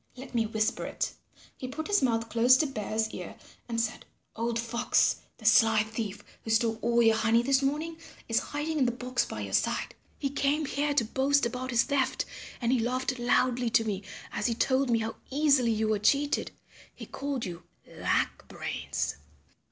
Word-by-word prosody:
Let 260 +1 -10
me 225 -2 +1
whisper 220 +2 -1
it." - - -3 0.4
He 255 - -6
put 300 +5 -5
his 410 0 +3
mouth 230 -3 +1
close 240 +3 +5
to 310 - +2
Bear's 220 -4 -2
ear - - -7 0.3
and 230 -1 -1
said, 225 -1 -2 0.3
"Old 230 +1 -1
Fox, 235 +1 +2 0.2
the 220 - -14
sly 220 -1 +5
thief 220 -2 -5 0.2
who - - -7
stole 225 0 +2
all 235 0 +3
your 225 -1 +5
honey 225 +1 +3
this 270 +1 +3
morning 305 +4 -1 0.3
is 230 - +2
hiding 300 +2 -2
in 265 - +4
the - - +2
box 250 +1 -1
by - - -6
your - - -6
side. - - 0 0.2
He 275 -2 -2
came 285 +2 +1
here 285 +1 -1
to 245 -5 +3
boast 275 +4 +2
about 250 +2 -3
his 235 -2 +3
theft 280 -3 0 0.3
and 235 -1 0
he 255 - +3
laughed 255 +2 -1
loudly 245 0 +2
to 230 -1 +3
me 200 -3 -2 0.3
as 210 - -1
he 230 - 0
told 260 +2 +2
me 235 - +4
how 225 0 -3
easily 280 -3 +3
you 220 -1 +1
were 215 -1 +1
cheated. 285 +7 +2 0.5
He - - -8
called 275 -3 -4
you 175 -2 -6 0.2
Lack - - -1
Brains." - - -3
240 Hz, 190 wpm, -29 LUFS, 225-275 Hz, 0.5 s, close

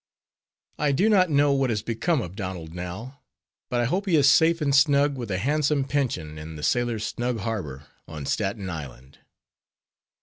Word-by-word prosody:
I 145 -1 +2
do 190 +10 +2
not 185 -4 +4
know 145 -1 +3
what 135 -2 +1
has 105 -2 -1
become 125 +5 0
of 90 +2 -8
Donald 90 -5 -6
now, 95 +10 -7 0.5
but 120 -2 0
I - - +1
hope 190 - -1
he 175 - +3
is 140 -3 +5
safe 165 +4 +5
and 145 -3 0
snug 140 0 +4
with 120 -4 -6
a 95 - -1
handsome 145 +5 +1
pension 120 - -2
in 80 +1 -8
the 75 - -8
"Sailors' 120 0 0
Snug 120 -2 -2
Harbor" 85 - -4 0.2
on 75 -3 -7
Staten 100 +3 -2
Island. 70 -6 -8
120 Hz, 175 wpm, -25 LUFS, 90-145 Hz, 0.5 s, is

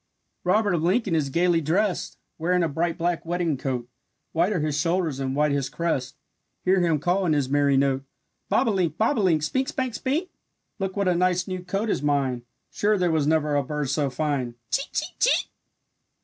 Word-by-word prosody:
Robert 205 +2 +2
of 170 - +1
Lincoln 190 +3 +1
is 150 -4 +1
gaily 170 +3 +2
drest, 180 +5 0 0.2
Wearing 180 +2 +2
a - - +2
bright 165 +3 -1
black 175 0 -1
wedding 170 -2 -1
coat, 125 -2 -3 0.4
White 170 +5 +2
are 190 - 0
his 150 -1 -1
shoulders 165 -2 0
and 135 0 -2
white 150 0 +2
his 140 -2 -1
crest. 140 -6 -2 0.5
Hear 185 0 +4
him 165 -3 +2
call 175 +6 +1
in 155 - +3
his 140 -3 0
merry 140 -1 +3
note: 135 -1 +1 0.5
"Bobolink, 185 - +1
bob 230 +4 +2
o' - - +2
link, 165 -6 +2
Spink, 260 - 0
spank, 260 -5 -2
spink; 300 +10 -1 0.5
Look 195 0 -3
what 200 -1 +1
a 180 - +4
nice 180 0 +1
new 185 -1 -4
coat 195 +5 -2
is 205 - 0
mine, 140 -4 0 0.3
Sure 210 +1 +1
there 180 -2 +1
was 155 -3 +1
never 150 -2 +2
a 145 - +3
bird 145 0 -3
so 140 -1 +1
fine! 135 -3 -2 0.2
Chee, 275 - 0
chee, - - -3
chee!" - - +2
165 Hz, 195 wpm, -25 LUFS, 145-185 Hz, 0.5 s, Hear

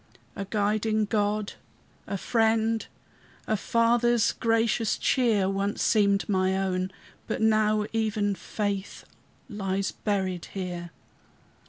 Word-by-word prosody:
A 195 - -4
guiding 215 +1 +1
God, 210 0 0 0.5
a 200 - -2
Friend, 225 +1 +1 0.6
A 220 - +1
Father's 235 +1 +2
gracious 225 -1 +1
cheer, 225 -7 +2
Once 195 +1 -1
seemed 200 -2 +3
my 190 -1 +1
own; 185 -1 -1 0.4
but 220 - -2
now 215 -1 +3
even 215 -2 0
faith 200 +1 -4 0.4
Lies 195 -2 -2
buried 190 -4 -2
here. 175 -2 -4
210 Hz, 105 wpm, -27 LUFS, 195-220 Hz, 0.6 s, seemed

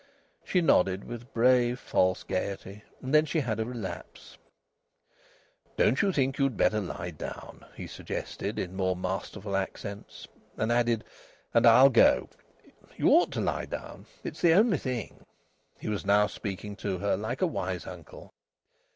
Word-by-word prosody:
She 180 - +1
nodded 95 - +3
with 120 +2 -9
brave, 125 +1 +3
false 95 -5 +1
gaiety. 100 +2 -4 0.2
And 130 +2 -4
then 155 0 +5
she 160 - 0
had 115 -5 -2
a 110 - 0
relapse. 115 -5 -8 1.4
"Don't 130 - +3
you 200 - +2
think 135 -4 0
you'd 135 -5 +1
better 110 - +3
lie 90 -2 -5
down?" 75 - -9
he - - -7
suggested - - -5
in 90 +1 -4
more 95 -1 0
masterful 95 +2 -4
accents. 100 +1 -5 0.3
And 110 +1 0
added; 120 -2 +2 0.5
"And - - +5
I'll 135 +1 +8
go....? 90 - +4 0.7
You - - +3
ought - - +5
to - - -1
lie - - -1
down. - - -8 0.2
It's - - -6
the 170 -2 +6
only 200 - +4
thing." 125 -4 -5 0.5
He - - -8
was 105 -2 -2
now 100 +1 +4
speaking 100 0 -6
to 100 -4 -2
her 100 +3 0
like 110 - -3
a - - +6
wise 95 - -3
uncle. 85 -4 -11
110 Hz, 155 wpm, -28 LUFS, 95-130 Hz, 1.4 s, I'll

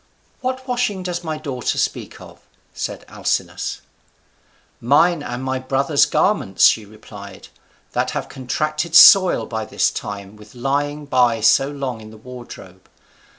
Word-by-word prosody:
"What 260 0 -4
washing 245 -7 -1
does 175 -1 -4
my 155 -2 -4
daughter 135 -5 -3
speak - - -3
of?" - - -14 0.3
said - - -6
Alcinous. - - -3 1.0
"Mine 150 +7 +3
and 120 -2 -6
my 130 0 -2
brothers' 140 +3 +1
garments," 140 - +2
she 110 - +3
replied, 100 -2 -13 0.4
"that - - -1
have - - -4
contracted 155 +5 -3
soil 185 0 +8
by 110 -1 -4
this - - 0
time 100 0 -7
with 105 +3 -16
lying 145 +4 -2
by 125 -4 +2
so 135 +5 +3
long 135 -5 -5
in 110 - -12
the 110 - -14
wardrobe. 125 +2 -12
135 Hz, 140 wpm, -20 LUFS, 115-155 Hz, 1.0 s, soil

